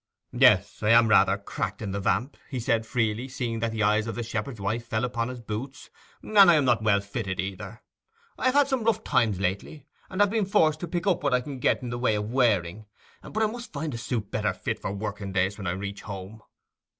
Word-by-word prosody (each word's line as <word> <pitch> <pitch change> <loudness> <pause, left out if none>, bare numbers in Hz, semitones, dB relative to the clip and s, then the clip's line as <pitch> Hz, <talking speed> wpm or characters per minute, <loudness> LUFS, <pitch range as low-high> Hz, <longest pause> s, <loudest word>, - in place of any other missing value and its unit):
'Yes, 95 +2 +4
I 105 - +1
am 115 0 +6
rather 105 - +5
cracked - - -4
in 100 -3 -4
the 100 - -2
vamp,' 110 +7 0
he 130 - -3
said 115 -1 0
freely, 115 0 -1
seeing 120 -3 -3
that 115 0 -1
the 110 -1 -1
eyes 105 +2 +2
of 115 - -4
the 120 - -3
shepherd's 110 +1 -4
wife 110 +4 -2
fell 110 +1 0
upon 115 -1 -2
his 125 -1 -7
boots, 120 +6 -7 0.3
'and 215 -1 +1
I 185 -4 +9
am 145 -3 +3
not 120 -3 +3
well 105 -2 +3
fitted 100 -1 -4
either. 100 +4 -5 0.5
I - - -4
have 255 +1 +3
had 285 -1 +5
some 265 -4 -1
rough 230 0 +1
times 110 -6 +1
lately, 100 +10 -3 0.2
and 190 - -6
have 205 -1 +4
been 220 -2 +1
forced 155 -6 +3
to 175 - -5
pick 170 +1 -3
up 190 -4 +2
what 140 -3 +2
I 125 - +1
can 135 0 -7
get 125 - +1
in 120 - -4
the 120 - -4
way 120 -3 +2
of 105 +1 -3
wearing, 105 -5 +1 0.3
but 220 +1 -2
I - - +4
must 235 +2 -6
find 150 0 -3
a - - -4
suit 115 -4 -3
better - - 0
fit - - -3
for - - -4
working 100 -1 -5
days 95 +2 0
when 100 - -4
I - - +1
reach 100 +1 -6
home. 100 +2 -8
115 Hz, 240 wpm, -26 LUFS, 105-140 Hz, 0.5 s, I